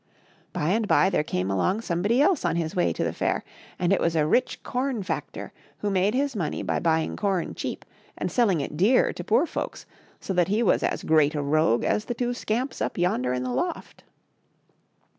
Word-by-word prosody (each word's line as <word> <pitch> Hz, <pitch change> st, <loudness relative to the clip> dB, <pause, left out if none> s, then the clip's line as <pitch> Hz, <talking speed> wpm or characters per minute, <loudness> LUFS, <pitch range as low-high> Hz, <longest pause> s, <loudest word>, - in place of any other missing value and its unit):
By 150 Hz, -, -1 dB
and 215 Hz, +3 st, +1 dB
by 190 Hz, -1 st, +4 dB
there 150 Hz, -, +1 dB
came 95 Hz, -8 st, -2 dB
along 185 Hz, -, +1 dB
somebody 205 Hz, +8 st, +1 dB
else 345 Hz, -1 st, +2 dB
on 170 Hz, -2 st, +1 dB
his 170 Hz, +2 st, -2 dB
way 180 Hz, -, +2 dB
to -, -, -2 dB
the -, -, -1 dB
fair, -, -, -1 dB, 0.3 s
and 180 Hz, +1 st, +2 dB
it -, -, +1 dB
was 170 Hz, -1 st, +1 dB
a 155 Hz, -2 st, +3 dB
rich 250 Hz, +11 st, +1 dB
corn 250 Hz, -4 st, -2 dB
factor 185 Hz, -, -5 dB, 0.2 s
who 205 Hz, -, -2 dB
made 195 Hz, +4 st, +2 dB
his 275 Hz, -1 st, 0 dB
money 165 Hz, -7 st, -2 dB
by -, -, -1 dB
buying 160 Hz, -1 st, +1 dB
com 195 Hz, -4 st, -1 dB
cheap, -, -, -5 dB, 0.3 s
and -, -, -3 dB
selling 200 Hz, -, +2 dB
it 140 Hz, -, -5 dB
dear 205 Hz, +11 st, +3 dB
to -, -, -7 dB
poor -, -, +3 dB
folks, -, -, -5 dB, 0.3 s
so 195 Hz, -, -4 dB
that 175 Hz, -2 st, +2 dB
he 210 Hz, +4 st, +1 dB
was 200 Hz, -, +3 dB
as -, -, -1 dB
great 155 Hz, -1 st, +3 dB
a 145 Hz, -, -1 dB
rogue 145 Hz, -5 st, +2 dB
as 210 Hz, -, 0 dB
the 240 Hz, -, -3 dB
two 245 Hz, 0 st, -1 dB
scamps 245 Hz, +3 st, -3 dB
up -, -, -2 dB
yonder 130 Hz, -8 st, +1 dB
in 125 Hz, 0 st, -1 dB
the 125 Hz, -1 st, -3 dB
loft. 130 Hz, -, -4 dB
185 Hz, 210 wpm, -25 LUFS, 155-225 Hz, 0.3 s, by